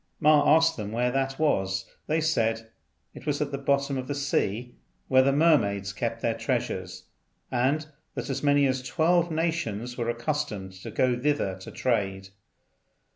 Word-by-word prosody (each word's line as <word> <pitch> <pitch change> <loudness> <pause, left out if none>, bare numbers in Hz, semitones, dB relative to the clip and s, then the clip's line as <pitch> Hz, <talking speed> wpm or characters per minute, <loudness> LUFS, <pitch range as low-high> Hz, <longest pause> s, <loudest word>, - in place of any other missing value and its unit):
Ma 150 -1 +6
asked 165 0 +3
them 105 -2 -5
where 120 +2 +1
that 135 +1 -1
was. 95 -11 +1 0.2
They 160 +1 +1
said 115 -7 0 0.4
it - - -12
was 145 -1 0
at 150 -1 -1
the 140 - -3
bottom 140 0 +1
of 130 - -6
the 145 - -2
sea, 125 -4 -1 0.4
where 130 0 +6
the 135 +1 +3
mermaids 105 -11 +2
kept 115 +2 -3
their 115 - +2
treasures, 95 -8 -3 0.5
and 135 +5 +1 0.3
that - - -4
as 135 -1 -2
many 145 -1 +4
as 130 -1 0
twelve 170 +6 +2
nations 155 -8 -2
were 120 0 -1
accustomed 120 -6 -2
to 95 - -9
go 130 -1 +1
thither 145 -8 0
to 95 - -9
trade. 95 -6 -1
130 Hz, 165 wpm, -27 LUFS, 115-150 Hz, 0.5 s, Ma